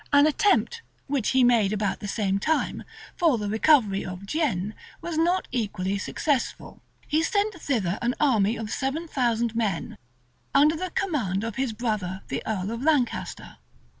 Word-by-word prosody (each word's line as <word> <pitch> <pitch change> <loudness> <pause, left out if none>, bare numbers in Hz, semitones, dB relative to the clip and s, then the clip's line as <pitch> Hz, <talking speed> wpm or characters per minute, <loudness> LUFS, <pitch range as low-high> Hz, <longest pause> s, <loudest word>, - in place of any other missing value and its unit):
An 285 0 +6
attempt, 410 +8 +2 0.2
which 270 -5 0
he 260 -1 +4
made 230 -5 +4
about 205 -2 -1
the 205 - -6
same 195 -1 0
time, 315 +9 0 0.3
for 325 -8 +3
the 210 -1 -3
recovery 220 -2 +3
of 180 +2 -7
Guienne, 210 - -1 0.3
was 335 -1 -5
not 345 +4 +1
equally 200 -5 -2
successful. 280 +4 -2 0.3
He 310 +2 +2
sent 415 +4 +1
thither 225 - -1
an 240 +1 0
army 230 -7 +3
of 220 -2 -5
seven 280 +5 -2
thousand 235 -5 0
men, 210 -7 -2 0.6
under 300 +3 +5
the 370 +3 -3
command 240 - -1
of 225 -2 -4
his 265 -3 0
brother, 210 -5 -3
the 135 - -2
earl 205 -2 -2
of 230 +1 -4
Lancaster. 285 -5 -1
235 Hz, 160 wpm, -26 LUFS, 205-300 Hz, 0.6 s, An